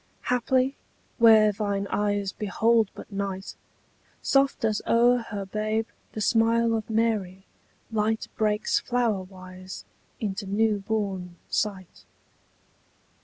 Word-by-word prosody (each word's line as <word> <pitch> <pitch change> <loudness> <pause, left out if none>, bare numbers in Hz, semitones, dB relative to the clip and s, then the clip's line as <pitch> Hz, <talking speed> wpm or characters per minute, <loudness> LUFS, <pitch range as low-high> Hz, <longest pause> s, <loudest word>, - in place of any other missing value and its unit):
Haply, 255 +2 +2 0.4
where 220 -2 +7
thine 200 -1 -2
eyes 205 -1 0
behold 220 +1 +2
but - - -11
night, 195 -1 -4 0.7
Soft 275 -3 +2
as 215 -2 0
o'er 240 +1 +4
her 200 -2 -4
babe 215 +2 -1 0.3
the 215 - -4
smile 230 +1 +3
of 220 -1 -2
Mary 215 -4 0 0.5
Light 220 0 0
breaks 210 0 +1
flowerwise 185 -6 -3 0.4
into 200 -1 -3
new 210 +1 +1
born 195 -4 -3 0.2
sight. 195 -4 -3
215 Hz, 105 wpm, -26 LUFS, 195-225 Hz, 0.7 s, where